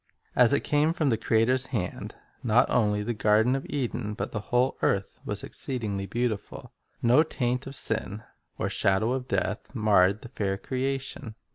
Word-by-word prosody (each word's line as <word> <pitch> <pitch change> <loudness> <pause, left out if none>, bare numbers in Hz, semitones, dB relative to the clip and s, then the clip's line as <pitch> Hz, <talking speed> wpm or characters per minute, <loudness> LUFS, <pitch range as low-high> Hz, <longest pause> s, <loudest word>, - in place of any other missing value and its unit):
As 125 0 +6
it 140 - +2
came 150 +2 +2
from 155 -5 +1
the - - +3
.Creator's 125 +4 +2
hand, 95 -8 -4 0.3
not 120 +1 +3
only 105 -3 +2
the 120 +3 -2
garden 110 +4 +3
of 135 - -4
Eden 120 -6 -3
but - - -4
the 105 - -3
whole 125 +2 +2
earth 100 0 0
was - - -1
exceedingly 105 -7 -3
beautiful. 120 -3 -3 0.3
No 120 +5 +6
taint 125 -4 -1
of 135 - -6
sin, 110 -2 -2 0.3
or - - -1
shadow 95 +5 +1
of 130 0 -2
death, - - -2
marred 105 -3 +3
the 125 - -9
fair 100 -6 -2
creation. 130 -1 -4
120 Hz, 165 wpm, -27 LUFS, 105-130 Hz, 0.3 s, As